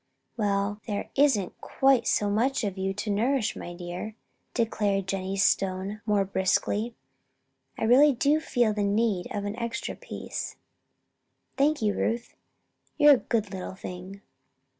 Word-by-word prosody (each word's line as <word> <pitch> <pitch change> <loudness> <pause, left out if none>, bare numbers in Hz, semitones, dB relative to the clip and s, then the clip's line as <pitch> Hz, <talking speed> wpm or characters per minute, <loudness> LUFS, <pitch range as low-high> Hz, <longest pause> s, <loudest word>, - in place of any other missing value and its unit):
"Well, 205 -1 0
there 205 -2 -3
isn't 265 -10 +2
quite 265 -3 +3
so 205 - +2
much 230 +6 +1
of 200 -3 -2
you 190 0 -1
to 210 +2 -3
nourish, 230 +2 +1
my 175 - -7
dear," 175 +5 -6 0.4
declared 205 -4 0
Jennie 190 0 -2
Stone, 195 +2 +1
more 205 -2 +3
briskly. 200 +4 0 0.8
"I - - -3
really 265 +6 +6
do 285 +4 +2
feel 240 -8 +1
the 210 - -2
need 205 -2 +1
of 205 -1 -3
an 205 +1 -3
extra 235 -1 -3
piece. - - -6 1.0
Thank 290 -2 +2
you, 210 -1 +2
Ruth! 230 +3 -2 0.6
You're 295 -1 +8
a - - +4
good 215 -5 -2
little 185 0 -5
thing." 185 +1 -8
210 Hz, 140 wpm, -27 LUFS, 195-235 Hz, 1.0 s, You're